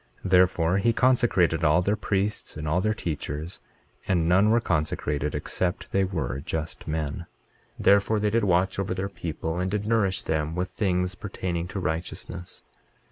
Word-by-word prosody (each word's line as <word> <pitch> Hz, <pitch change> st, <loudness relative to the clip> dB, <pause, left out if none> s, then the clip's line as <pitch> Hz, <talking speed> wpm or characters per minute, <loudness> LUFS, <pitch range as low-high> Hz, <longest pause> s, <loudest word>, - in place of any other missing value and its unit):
Therefore 90 Hz, -1 st, +3 dB
he 115 Hz, +3 st, +2 dB
consecrated 110 Hz, -11 st, +3 dB
all 80 Hz, +3 st, +4 dB
their 100 Hz, +3 st, +1 dB
priests 100 Hz, -2 st, -1 dB
and 75 Hz, 0 st, -4 dB
all 80 Hz, +4 st, +2 dB
their 110 Hz, +2 st, +1 dB
teachers; 80 Hz, -1 st, -4 dB, 0.5 s
and 85 Hz, -4 st, +2 dB
none 95 Hz, +4 st, +4 dB
were 115 Hz, +2 st, +4 dB
consecrated 75 Hz, -4 st, -1 dB
except 90 Hz, -1 st, -2 dB
they 95 Hz, -, +2 dB
were 80 Hz, -9 st, -2 dB
just 80 Hz, +1 st, -4 dB
men. 80 Hz, +1 st, -3 dB, 0.5 s
23:18 -, -, -5 dB
Therefore 100 Hz, +2 st, +4 dB
they 105 Hz, 0 st, +1 dB
did 115 Hz, 0 st, +2 dB
watch 95 Hz, 0 st, +2 dB
over 95 Hz, -1 st, -1 dB
their 95 Hz, +1 st, -2 dB
people, 85 Hz, -2 st, -4 dB
and 90 Hz, +1 st, 0 dB
did 105 Hz, +1 st, -2 dB
nourish 105 Hz, -5 st, +1 dB
them 80 Hz, 0 st, -1 dB
with 90 Hz, +1 st, -2 dB
things 90 Hz, -2 st, 0 dB
pertaining 90 Hz, -3 st, -4 dB
to 95 Hz, -, -5 dB
righteousness. 90 Hz, 0 st, -5 dB
90 Hz, 165 wpm, -26 LUFS, 80-100 Hz, 0.5 s, all